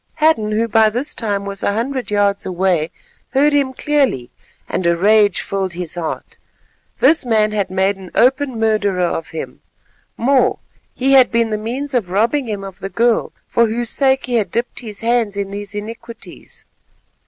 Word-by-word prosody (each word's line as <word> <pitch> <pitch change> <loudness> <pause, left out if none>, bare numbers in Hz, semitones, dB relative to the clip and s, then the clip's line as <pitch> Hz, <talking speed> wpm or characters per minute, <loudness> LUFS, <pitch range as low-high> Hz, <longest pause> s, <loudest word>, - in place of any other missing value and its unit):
Hadden, 305 -9 +2
who 225 +2 +1
by 220 0 +4
this 250 +7 -3
time 205 -3 -2
was 200 0 -6
a 200 - 0
hundred 250 +4 -2
yards 205 -1 +1
away, 180 -3 0 0.4
heard 290 +2 +4
him 280 -2 +2
clearly, 265 - 0 0.4
and 180 - -1
a 170 0 +2
rage 205 +1 +4
filled 190 -2 -3
his 175 -2 -3
heart. 170 -2 -5 0.6
This 310 +4 +4
man 215 -3 +2
had 205 -2 -1
made 190 +1 +1
an 190 -2 -11
open 260 -1 +2
murderer 205 -5 +1
of 165 -1 -3
him; 160 - -7 0.6
more, 260 +2 +3 0.4
he 265 +2 +1
had 265 -2 +7
been 230 -1 +1
the - - +1
means 260 +6 -4
of 230 -8 0
robbing 230 +8 +1
him 205 -2 -3
of 195 -1 -9
the 195 - -5
girl 235 +2 +1 0.2
for 235 0 +3
whose 235 +1 -3
sake 265 -1 +2
he 250 - -4
had 215 - 0
dipped 235 +2 -3
his 215 -4 -7
hands 230 -3 +1
in 200 -1 -3
these 205 0 -6
iniquities. 230 +2 -9
220 Hz, 175 wpm, -18 LUFS, 195-250 Hz, 0.6 s, had